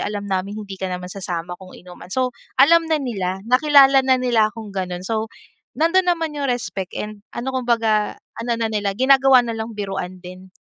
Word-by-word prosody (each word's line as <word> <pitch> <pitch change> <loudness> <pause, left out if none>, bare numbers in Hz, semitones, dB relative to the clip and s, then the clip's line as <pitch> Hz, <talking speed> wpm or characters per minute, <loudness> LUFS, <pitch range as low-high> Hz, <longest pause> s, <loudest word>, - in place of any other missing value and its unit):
alam 205 -1 -3
namin 195 +1 -3
hindi 195 -1 -8
ka 190 - -2
naman 180 0 -5
sasama 175 -3 -5
kung 185 -1 -12
inuman." 180 0 -13
So, 255 +5 -1 0.2
alam 325 +5 +5
na 320 - +2
nila, 195 -9 -3
nakilala 270 +2 +5
na 260 0 +3
nila 240 -4 +2
akong 215 -2 -10
ganun. 180 -2 -4
So, 220 +2 -2 0.5
nandun 345 +4 +2
naman 330 -3 0
yung 280 - -1
respect 225 -7 -3
and 210 -1 -6
ano 245 +3 -3
kumbaga 230 -4 +1 0.2
ano 235 +1 -2
na 230 -1 -2
nila 205 -2 -1
ginagawa 265 +2 +5
na 230 -2 -4
lang 220 0 -5
biruan 195 -3 -5
din. 185 +1 -11
220 Hz, 185 wpm, -21 LUFS, 190-260 Hz, 0.5 s, alam